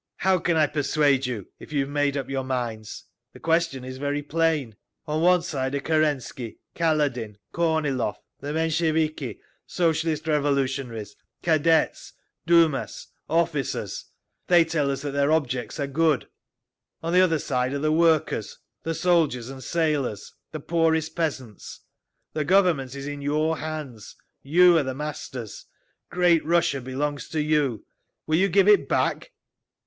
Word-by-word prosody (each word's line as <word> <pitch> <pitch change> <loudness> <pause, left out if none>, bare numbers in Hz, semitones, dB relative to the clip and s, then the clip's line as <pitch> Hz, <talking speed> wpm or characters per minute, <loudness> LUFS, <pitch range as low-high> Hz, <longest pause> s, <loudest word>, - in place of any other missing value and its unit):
"How 190 0 +2
can 170 -1 +1
I 155 - +5
persuade 145 -2 +1
you, 110 -7 -4
if - - -12
you 145 -2 +1
have 135 - -3
made 145 -1 0
up 135 - -3
your 135 -1 -2
minds? 120 -5 -4 0.3
The - - -13
question 165 -5 0
is 130 0 -7
very 145 +1 -2
plain. 155 -6 0 0.3
On 155 0 -1
one 180 0 +4
side 140 -6 -2
are - - 0
Kerensky, 145 -6 -1 0.2
Kaledin, 145 -10 0 0.2
Kornilov, 150 -10 0 0.2
the 145 +1 -5
Mensheviki, 155 - 0 0.3
Socialist 160 -2 0
Revolutionaries, 135 -7 -1 0.3
Cadets, 160 0 +2 0.3
Dumas, 165 -4 +2 0.2
officers…. 160 -5 -1 0.4
They 175 -2 +6
tell 155 -4 0
us 135 0 -3
that 145 - -3
their 140 +1 +1
objects 130 -4 -1
are 140 - 0
good. 150 -1 +1 0.8
On 165 +1 -2
the 180 - +6
other 170 -3 +3
side 125 -3 -1
are 140 - -2
the 155 +2 0
workers, 160 -9 +1 0.2
the 165 0 -3
soldiers 155 -10 +1
and 135 -1 -9
sailors, 145 - -1 0.2
the 155 - -5
poorest 160 0 0
peasants. 135 - -4 0.5
The 155 - -1
Government 160 -7 +2
is 140 0 -6
in 145 0 -5
your 155 +3 0
hands. 150 -9 -7 0.3
You 175 +4 +5
are - - 0
the 130 -1 -4
masters. 135 -6 -6 0.4
Great 175 -2 +3
Russia 165 -4 +1
belongs 135 +2 -3
to 160 - -2
you. 150 -6 0 0.4
Will 155 0 +1
you 195 +3 +3
give 195 +2 +3
it 210 -1 +5
back?" - - 0
150 Hz, 145 wpm, -25 LUFS, 135-165 Hz, 0.8 s, They